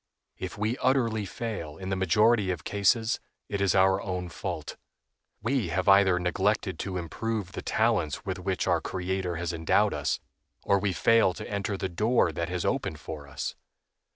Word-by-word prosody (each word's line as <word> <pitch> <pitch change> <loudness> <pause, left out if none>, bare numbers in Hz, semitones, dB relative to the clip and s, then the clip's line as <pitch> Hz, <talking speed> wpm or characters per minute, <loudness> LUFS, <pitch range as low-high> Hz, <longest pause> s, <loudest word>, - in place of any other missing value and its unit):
If 95 +4 -5
we 110 +4 -1
utterly 115 -5 +1
fail, 95 -9 -5
in 95 +1 -6
the 95 - 0
majority 105 +3 +3
of 90 -3 -2
cases, 110 +4 +2 0.3
it 100 -2 -2
is 100 -3 +3
our 95 0 +4
own 90 -2 -3
fault. - - -5 0.7
We 120 -3 +1
have 90 +4 -1
either 95 -2 +6
neglected 95 +2 0
to 95 -2 -3
improve 100 +3 -3
the - - -5
talents 105 -10 0
with 95 -1 -3
which 95 0 -1
our 85 -3 +2
Creator 95 0 -2
has 85 +1 -3
endowed 80 -1 +2
us, - - -1 0.4
or 100 - +3
we 100 0 0
fail 95 +1 +4
to - - -7
enter 100 -1 -2
the 95 - -2
door 105 +1 +2
that 85 +2 -3
has 90 -1 -2
opened 75 - -1
for 75 0 -7
us. 70 - -4
95 Hz, 175 wpm, -28 LUFS, 90-105 Hz, 0.7 s, either